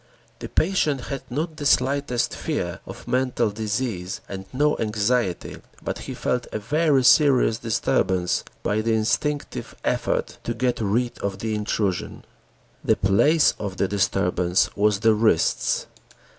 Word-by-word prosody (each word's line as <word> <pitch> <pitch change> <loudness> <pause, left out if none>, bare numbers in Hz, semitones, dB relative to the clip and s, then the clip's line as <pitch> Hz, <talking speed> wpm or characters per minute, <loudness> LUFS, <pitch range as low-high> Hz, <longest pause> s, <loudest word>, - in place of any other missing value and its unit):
The - - -7
patient 155 -5 +1
had 140 +1 -5
not 155 +5 -3
the 145 - -5
slightest 130 -3 +1
fear - - -3
of - - -10
mental 125 -3 +1
disease 105 -3 -3
and 95 -1 -7
no 150 +3 +2
anxiety, 110 -2 -1 0.3
but - - -3
he - - -7
felt 125 -1 -1
a - - -2
very 145 +4 +2
serious 130 -5 +5
disturbance 95 -5 0 0.2
by 105 +1 +1
the 115 +1 0
instinctive 115 +7 -1
effort - - -1
to 120 - -3
get 120 0 0
rid 115 +4 0
of 100 -1 -3
the 110 +2 -3
intrusion. 105 -3 -2 0.6
The - - +3
place 145 +12 +4
of 100 -2 -5
the 100 - +1
disturbance 95 -2 +1
was 105 -1 +2
the 110 -1 +5
wrists. 110 -6 +2
115 Hz, 140 wpm, -24 LUFS, 100-130 Hz, 0.6 s, serious